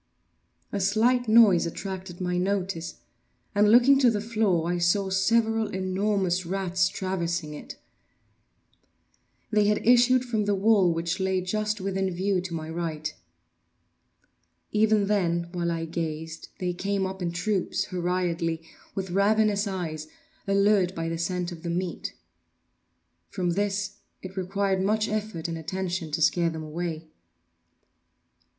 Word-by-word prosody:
A 200 - -2
slight 225 +5 +2
noise 215 -7 +6
attracted 185 0 -6
my 180 -1 -1
notice, 185 -3 -2 0.5
and, 210 0 +4
looking 250 +4 +6
to 255 -3 +5
the 215 -3 0
floor, 210 -6 +1
I 175 - -1
saw 190 +3 +2
several 225 +3 +2
enormous 190 -1 0
rats 185 +1 0
traversing 175 -4 -3
it. 150 - -9 1.8
They 210 -1 +3
had 210 - +1
issued 250 +1 +5
from 220 -4 -1
the 205 0 +1
well, 195 -3 +4
which 165 +3 -2
lay 190 0 +1
just 215 +3 -1
within 195 0 -1
view 185 +1 0
to 180 -1 -6
my 155 -1 -5
right. 160 -2 -4 1.6
Even 215 -1 +3
then, 170 -4 0
while 175 -1 -1
I 165 -1 -2
gazed, 160 -1 -5
they 180 -1 -2
came 195 +2 -1
up 190 0 -5
in 175 -1 -1
troops, 190 +1 -1
hurriedly, 175 -3 -1 0.3
with 190 -2 -3
ravenous 205 +1 +2
eyes, 160 -5 -4 0.4
allured 195 -2 +3
by 165 0 -2
the 165 - -3
scent 180 +1 -2
of 165 -2 -9
the 170 - -4
meat. 175 +1 -3 1.1
From 180 -3 -1
this 205 +2 -1 0.3
it 185 +1 -8
required 190 0 0
much 215 +3 +1
effort 210 -6 -3
and 165 -1 -4
attention 180 0 -3
to 155 +1 0
scare 170 +1 +3
them 160 -1 -6
away. 160 0 -4
190 Hz, 135 wpm, -26 LUFS, 170-205 Hz, 1.8 s, noise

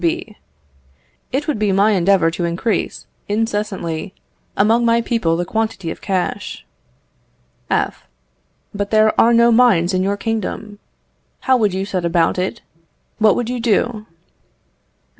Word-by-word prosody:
B. 330 -10 -2 1.0
It 280 +4 -2
would 295 -8 -1
be 210 -2 +1
my 200 +3 +3
endeavour 185 -3 +3
to 175 - -4
increase, 170 +6 -2 0.2
incessantly, 205 -5 -2 0.4
among 225 +4 +3
my 230 0 +3
people 225 -8 0
the 175 - -2
quantity 220 -5 -2
of - - -9
cash. 190 -3 -3 1.0
F. - - -1 0.7
But 200 0 -3
there 215 0 +4
are 235 - +5
no 235 0 +5
mines 225 -7 +4
in 185 - +1
your 200 +2 0
kingdom. 210 -1 -4 0.6
How 260 - +3
would 210 -6 +1
you 190 +1 -2
set 185 -3 -3
about 170 +1 +1
it? 185 - -3 0.6
What 215 -2 +4
would 245 - -2
you 250 0 -3
do? 225 -1 0
210 Hz, 140 wpm, -19 LUFS, 185-230 Hz, 1.0 s, are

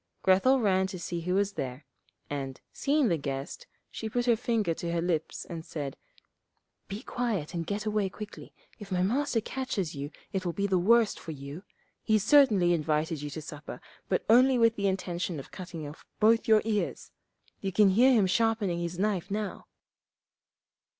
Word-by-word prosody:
Grethel 195 +9 +4
ran 190 -4 +2
to 190 - -6
see 170 0 -4
who 180 +2 -1
was 200 0 +1
there, 130 +2 -5 0.4
and, 135 -2 -5
seeing 285 -1 +2
the 170 -5 +2
guest, 140 - -5 0.2
she 220 - -5
put 245 +2 -1
her 240 -2 +4
finger 220 -6 0
to 170 +1 -4
her 170 - 0
lips 165 -2 -2
and 165 -2 -7
said, 145 -4 -5 0.9
'Be 200 +3 -6
quiet, 215 -11 -2
and 165 -1 -3
get 210 +1 -3
away 210 -2 0
quickly; 210 +2 -9 0.3
if 205 -2 -10
my 180 -1 +1
Master 250 +4 +1
catches 215 -9 -3
you 140 0 -5 0.2
it 190 -1 -1
will 175 -2 -2
be 200 - -1
the 190 -2 +2
worse 225 +4 +4
for 160 - -8
you. 140 +4 -8 0.4
He 220 - +3
certainly 210 -7 +5
invited 155 -1 0
you 145 - -4
to 155 +2 -7
supper, 150 -1 -8 0.3
but - - 0
only 255 +3 +6
with 230 -1 +4
the 200 -2 0
intention 180 -3 -2
of 135 - -10
cutting 170 -4 -7
off 145 - -11 0.2
both 225 +1 +4
your 220 -1 +5
ears. 215 -2 -2 0.5
You 195 - -3
can 200 +2 +5
hear 240 +8 +5
him 220 -6 +4
sharpening 205 -2 +1
his 170 0 -4
knife 195 -1 0
now.' 205 0 -4
190 Hz, 180 wpm, -29 LUFS, 165-220 Hz, 0.9 s, only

